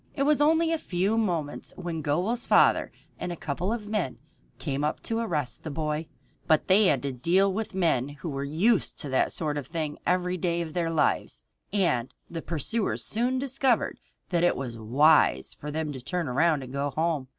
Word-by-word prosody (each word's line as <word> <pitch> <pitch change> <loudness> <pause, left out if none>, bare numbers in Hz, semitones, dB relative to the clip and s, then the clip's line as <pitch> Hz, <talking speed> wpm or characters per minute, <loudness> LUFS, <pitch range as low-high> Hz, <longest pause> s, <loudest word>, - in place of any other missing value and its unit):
It 275 - +1
was 295 0 +3
only 325 +2 +4
a 325 - 0
few 190 +1 0
moments 170 -10 -2
when 170 -3 -4
Gobel's 180 +12 -1
father - - +4 0.3
and 180 - -3
a - - -3
couple 165 +5 -3
of 225 -3 -3
men 205 - -2 0.4
came 140 +1 -3
up 150 - -1
to 225 0 -1
arrest 150 - -2
the 160 - -6
boy, 155 +1 -2 0.4
but 155 - +3
they 200 +3 +5
had 140 -8 +2
to 140 - -1
deal 180 +10 +2
with 215 -1 -4
men 160 -8 +1
who 145 +3 -7
were 140 -1 -3
used 175 +10 +1
to 145 - -5
that 130 - +2
sort 150 -2 -1
of 135 - -8
thing 155 -2 -4
every 180 0 +1
day 170 0 0
of 160 -2 -5
their 170 -2 0
lives, 150 - 0 0.3
and 170 - +1 0.2
the 165 -1 -4
pursuers 175 - -1
soon 245 +4 0
discovered 265 -2 +1 0.3
that 175 -2 +1
it 175 - +4
was 125 -3 -5
wise 120 - +3
for 150 - -8
them 155 0 -2
to 130 -3 -7
turn 170 +4 -2
around 150 +3 +2
and 130 0 -9
go 140 +1 -1
home. 155 -3 -1
165 Hz, 195 wpm, -27 LUFS, 145-195 Hz, 0.4 s, they